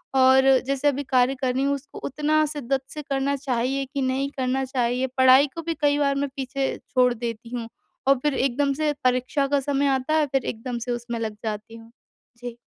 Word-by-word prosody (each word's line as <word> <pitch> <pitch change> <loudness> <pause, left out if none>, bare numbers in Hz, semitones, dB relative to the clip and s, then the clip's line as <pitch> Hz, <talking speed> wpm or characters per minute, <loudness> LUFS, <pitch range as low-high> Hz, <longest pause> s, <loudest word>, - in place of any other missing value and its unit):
और 265 0 +6 0.2
जैसे 275 +1 0
अभी 285 0 -2
कार्य 260 0 +2
कर 255 -1 +1
रही 265 - +1
हूँ। 280 0 +1
उसको 280 +1 -10
उतना 305 +2 +1
शिद्दत 270 -2 -1
से 300 - -5
करना 275 0 -1
चाहिए 270 0 -1
कि 280 - -1
नहीं 265 +1 0
करना 260 +1 0
चाहिए 250 0 0
पढ़ाई 260 +2 +6
को 330 - -4
भी 330 +1 -2
कई 290 0 +3
बार 280 -1 +2
मैं 280 0 -1
पीछे 270 0 -2
छोड़ 250 -2 +3
देती 230 -1 -6
हूँ, 230 -1 -4 0.4
और 275 -1 +5
फिर 295 - +1
एकदम 275 +2 +1
से 300 +1 0
परीक्षा 255 +3 +1
का 285 0 +2
समय 280 +1 0
आता 265 +4 -3
है 310 -1 +3
फिर 270 -1 -1
एकदम 240 +2 -4
से - - -1
उसमें 240 -1 -4
लग 220 -2 -3
जाती 215 +1 -5
हूँ, 225 0 -15 0.5
जी। 245 -1 -7
265 Hz, 210 wpm, -24 LUFS, 250-280 Hz, 0.5 s, और